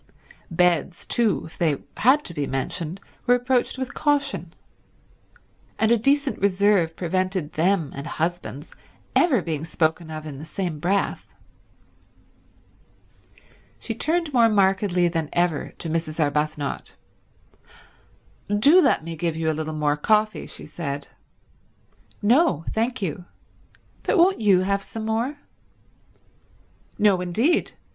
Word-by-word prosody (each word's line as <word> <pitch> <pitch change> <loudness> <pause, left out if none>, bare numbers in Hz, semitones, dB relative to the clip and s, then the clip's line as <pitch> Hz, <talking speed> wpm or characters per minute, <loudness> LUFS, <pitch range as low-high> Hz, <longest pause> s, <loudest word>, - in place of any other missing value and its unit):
Beds 175 0 +1
too, 230 -4 +1
if 160 - -13
they 155 -5 +2 0.2
had 270 +6 +4
to 170 - -6
be 145 -3 -2
mentioned, 155 +6 -3 0.3
were 245 - +6
approached 245 +1 0
with 260 -1 -4
caution; 280 - 0 1.3
and 220 +1 +2
a 235 - +5
decent 280 +3 +1
reserve 195 -4 +2
prevented 185 -2 -2
them 170 -2 +1
and 140 +3 -6
husbands 165 -3 -4 0.4
ever 270 - +3
being 155 -3 -3
spoken 160 0 -1
of 155 0 -6
in 140 -3 -7
the - - -8
same 170 -1 -4
breath. 195 +5 -1 2.5
She 230 - -5
turned 315 +5 -1
more 235 -2 +5
markedly 190 -3 +2
than 165 -3 -2
ever 175 -4 0
to - - -5
Mrs. 160 0 -3
Arbuthnot. 150 -1 -1 1.6
"Do 295 - +7
let 160 - +2
me 165 0 -6
give 165 0 -2
you 160 -1 0
a - - -1
little 155 0 -4
more 150 -1 +1
coffee," 215 +6 +1
she - - -9
said. 145 -3 -5 1.1
"No, 230 - +3
thank 230 0 -1
you. 180 0 -4 0.8
But - - +1
won't 365 +3 +4
you 200 -4 +4
have 200 +1 0
some 220 +2 -7
more?" 230 +6 -1 1.6
"No 200 -3 +3
indeed. 225 - +1
180 Hz, 125 wpm, -24 LUFS, 160-225 Hz, 2.5 s, Do